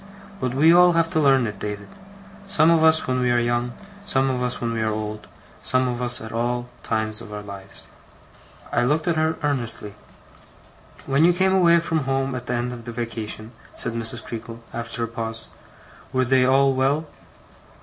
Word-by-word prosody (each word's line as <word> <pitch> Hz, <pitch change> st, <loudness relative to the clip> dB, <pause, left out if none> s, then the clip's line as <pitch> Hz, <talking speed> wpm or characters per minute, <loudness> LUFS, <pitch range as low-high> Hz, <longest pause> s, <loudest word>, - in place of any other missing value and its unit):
But 125 Hz, 0 st, -2 dB
we 160 Hz, +5 st, +6 dB
all 175 Hz, 0 st, +6 dB
have 165 Hz, 0 st, +1 dB
to 160 Hz, -, +1 dB
learn 135 Hz, -4 st, +4 dB
it, 105 Hz, -3 st, -5 dB
David; 105 Hz, -1 st, -5 dB, 0.6 s
some 160 Hz, -3 st, +5 dB
of 165 Hz, -1 st, +4 dB
us 160 Hz, 0 st, +5 dB
when 130 Hz, 0 st, 0 dB
we 125 Hz, -1 st, +1 dB
are 120 Hz, 0 st, +3 dB
young, 120 Hz, 0 st, 0 dB, 0.3 s
some 135 Hz, -9 st, +2 dB
of 125 Hz, -1 st, -2 dB
us 125 Hz, 0 st, -1 dB
when 115 Hz, -1 st, -2 dB
we 115 Hz, -, -2 dB
are 110 Hz, -, +1 dB
old, 105 Hz, 0 st, -5 dB, 0.3 s
some 130 Hz, 0 st, +1 dB
of 125 Hz, 0 st, -3 dB
us 120 Hz, 0 st, 0 dB
at 110 Hz, -, -8 dB
all 120 Hz, +1 st, -2 dB
times 110 Hz, 0 st, -1 dB
of 105 Hz, -, -10 dB
our 105 Hz, 0 st, -6 dB
lives.' 100 Hz, -1 st, -10 dB, 0.9 s
I 120 Hz, -, +2 dB
looked 150 Hz, +6 st, +1 dB
at 170 Hz, -, +2 dB
her 160 Hz, 0 st, +1 dB
earnestly. 120 Hz, -7 st, 0 dB, 1.1 s
'When 140 Hz, +3 st, +2 dB
you 175 Hz, +1 st, +6 dB
came 190 Hz, +2 st, +2 dB
away 170 Hz, -3 st, +5 dB
from 160 Hz, -4 st, -1 dB
home 135 Hz, 0 st, 0 dB
at 125 Hz, -1 st, -6 dB
the 125 Hz, -, -1 dB
end 120 Hz, +1 st, -2 dB
of 120 Hz, -1 st, -10 dB
the 120 Hz, -, -5 dB
vacation,' 115 Hz, -1 st, -5 dB, 0.3 s
said -, -, -2 dB
Mrs. 115 Hz, 0 st, -2 dB
Creakle, 115 Hz, 0 st, -8 dB
after 115 Hz, +1 st, -3 dB
a -, -, -1 dB
pause, 115 Hz, -1 st, -4 dB, 0.6 s
'were 130 Hz, -1 st, +1 dB
they 130 Hz, 0 st, +3 dB
all 135 Hz, +1 st, +4 dB
well? 135 Hz, +4 st, +1 dB
125 Hz, 195 wpm, -23 LUFS, 115-140 Hz, 1.1 s, we